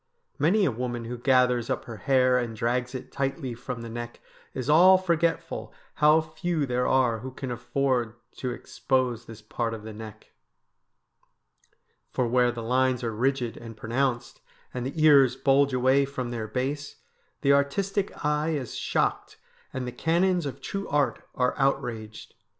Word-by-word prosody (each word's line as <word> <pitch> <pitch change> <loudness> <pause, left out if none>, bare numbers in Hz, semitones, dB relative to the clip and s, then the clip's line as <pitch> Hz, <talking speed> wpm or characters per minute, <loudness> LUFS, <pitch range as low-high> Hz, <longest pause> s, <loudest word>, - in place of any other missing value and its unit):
Many 190 +8 +3
a 140 - +2
woman 120 0 -4
who 120 +2 -5
gathers 125 -2 +3
up - - -2
her 115 -2 -8
hair 130 0 +3
and 120 -2 -3
drags 125 +3 -1
it 130 - -7
tightly 135 -1 -2
from 120 0 -6
the - - -6
neck 120 +1 -7 0.4
is 130 -1 -4
all 180 +5 +7
forgetful 170 -2 -1 0.3
how 150 +2 +6
few 160 0 -2
there 125 -1 0
are 125 -4 +2
who 130 +4 -6
can 130 0 -6
afford 120 -1 -1 0.2
to 130 - -3
expose 125 -1 -1
this 115 -2 -12
part 115 +1 -3
of 105 - -10
the 110 0 -8
neck. 110 0 -11 1.8
For 125 - 0
where 125 +1 +3
the 120 -1 -6
lines 130 +1 +1
are 115 -1 -2
rigid 125 +1 0
and 115 -2 -10
pronounced, 120 +3 -2 0.3
and 125 0 -3
the 155 +3 -3
ears 140 -5 +6
bulge 140 0 +3
away 130 +2 +3
from 130 -3 -5
their 115 -2 -4
base, 135 +5 -3 0.5
the 140 - +4
artistic 190 +8 0
eye 150 +2 +1
is 130 -5 -4
shocked - - -1 0.3
and 130 -1 -4
the 125 - -4
canons 175 +2 +1
of 135 - -7
true 195 0 -4
art 145 -1 0
are 125 -1 +1
outraged. 120 -6 -2
130 Hz, 160 wpm, -26 LUFS, 120-140 Hz, 1.8 s, all